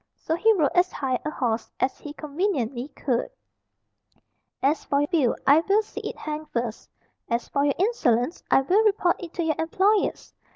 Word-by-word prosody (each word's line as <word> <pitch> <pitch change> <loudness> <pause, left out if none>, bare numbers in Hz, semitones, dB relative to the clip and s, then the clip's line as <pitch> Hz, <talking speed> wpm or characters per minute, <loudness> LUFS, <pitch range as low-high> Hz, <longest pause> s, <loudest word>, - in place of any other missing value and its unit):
So 320 - -2
he 445 +6 +4
rode 310 -9 +2
as 360 +1 +3
high 260 -3 -1
a 300 - -2
horse 235 -6 -2
as 260 - 0
he 295 - -8
conveniently 285 - -2
could. 265 - -2 1.3
"As 290 +4 +2
for 280 0 +1
your 290 - +1
bill, 300 -9 +2
I 285 +3 +7
will 400 +6 +2
see - - -8
it - - -6
hanged 305 0 -5
first. 235 -2 -4 0.4
As 235 +1 -1
for 280 - +1
your 285 - +1
insolence, 325 - +1
I - - +5
will 375 +11 +3
report 395 -5 +2
it 345 -2 -8
to 345 - -1
your 315 -2 +1
employers. 385 +6 +1
300 Hz, 180 wpm, -25 LUFS, 265-360 Hz, 1.3 s, I